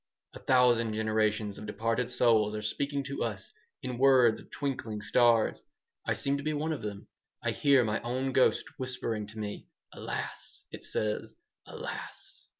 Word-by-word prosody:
A - - -9
thousand 120 -3 +4
generations 110 -1 0
of 105 - -8
departed 115 +3 -1
souls 115 -4 +3
are 105 - -4
speaking 140 +5 -1
to 140 +1 -3
us 105 -4 -4 0.3
in 125 -1 -4
words 130 -4 +6
of - - -15
twinkling 120 -6 -3
stars. 115 +1 +3 0.5
I - - +2
seem 140 0 0
to 140 - -6
be 155 +1 0
one 155 +2 -1
of 150 - -5
them. 100 -1 -6 0.4
I - - +1
hear 140 -3 +4
my 110 -1 -1
own 130 +3 -1
ghost 130 - +3
whispering 125 -5 -3
to 110 +2 -12
me: 105 -1 -5 0.3
'Alas!' - - -6
it - - -9
says, 105 -1 -2 0.3
'Alas!'" - - -8
115 Hz, 160 wpm, -30 LUFS, 110-130 Hz, 0.5 s, words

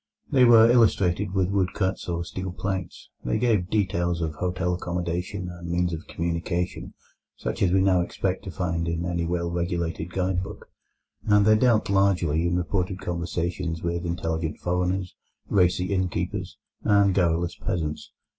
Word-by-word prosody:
They 130 -3 +6
were 115 -1 +8
illustrated 105 -5 +3
with 95 0 +1
woodcuts 95 -1 -1
or 85 0 -1
steel 95 +2 -5
plates. 95 -1 -4
They - - 0
gave 105 -7 +1
details 90 -5 0
of 80 -2 -2
hotel 90 +3 -1
accommodation, 90 +2 -3
and 90 0 -8
of - - -4
means 90 0 0
of 80 - -6
communication, 85 +1 -3 0.4
such - - -4
as 95 - +3
we 95 +1 +4
now 95 -2 +4
expect 95 +1 -2
to - - -5
find 85 -2 -2
in 85 +1 -2
any 85 -1 -1
well 85 0 -1
regulated 85 -1 -2
guide 90 0 0
book, 100 +2 -9 0.6
and 105 -1 +5
they 110 0 +6
dealt 115 -1 +3
largely 90 -5 +2
in 85 - 0
reported 90 +1 -1
conversations 85 -2 -3
with 85 0 -2
intelligent 80 -2 -2
foreigners, 90 +1 -1 0.4
racy 90 0 +2
innkeepers, 95 -2 -2 0.2
and 100 -1 +4
garrulous 85 -2 +1
peasants. 75 -3 -3
90 Hz, 155 wpm, -25 LUFS, 85-95 Hz, 0.6 s, were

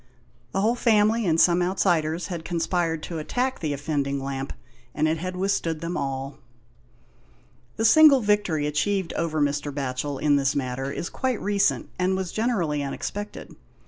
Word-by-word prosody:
The 195 - 0
whole 220 +3 +3
family, 220 -2 +3
and 165 -1 +2
some 175 +1 +5
outsiders, 175 -3 +1
had 170 -4 -5
conspired 165 -1 -1
to 165 -2 -5
attack 250 +11 -2
the 155 -3 -2
offending 140 -1 -2
lamp, 135 0 -4 0.4
and 155 +1 +2
it 160 +1 0
had 185 +2 -4
withstood 180 -4 -1
them 165 +2 -4
all. 135 +1 -4 1.4
The 225 - 0
single 280 +3 +7
victory 205 -8 +1
achieved 175 +5 0
over 160 -2 -1
Mr. 145 0 0
Batchel 140 0 -3
in 145 -1 +3
this 135 0 +1
matter 135 0 -2
is 170 - -4
quite 260 -4 -1
recent, 200 0 +1
and 185 +1 +2
was 185 -2 -3
generally 185 -11 0
unexpected. 205 +9 -5
165 Hz, 155 wpm, -25 LUFS, 145-200 Hz, 1.4 s, single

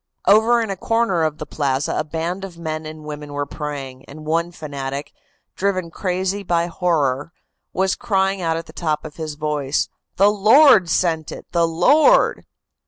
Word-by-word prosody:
"Over 225 +3 +5
in 220 -3 -2
a - - -2
corner 225 -3 0
of 155 -1 0
the - - -6
plaza 140 -1 -1
a - - 0
band 165 +5 -4
of 185 -3 -8
men 155 -1 -4
and 155 0 -9
women 150 -1 -7
were 145 0 -2
praying, 140 -4 -6
and 155 +2 -11
one 165 +2 0
fanatic, 140 -3 -6 0.4
driven 185 -3 -1
crazy 190 +2 -2
by 170 -3 0
horror, 165 -4 -1 0.4
was 190 0 +1
crying 195 -2 0
out 165 -1 0
at 165 - -6
the - - -14
top 155 -3 -2
of 150 - -9
his 155 -2 -5
voice: 150 -2 -1 0.3
"'The 200 +2 +5
Lord 215 - +6
sent 165 -2 0
it, - - -9
the 170 -1 +2
Lord! 285 - +4
165 Hz, 170 wpm, -21 LUFS, 150-190 Hz, 0.4 s, Lord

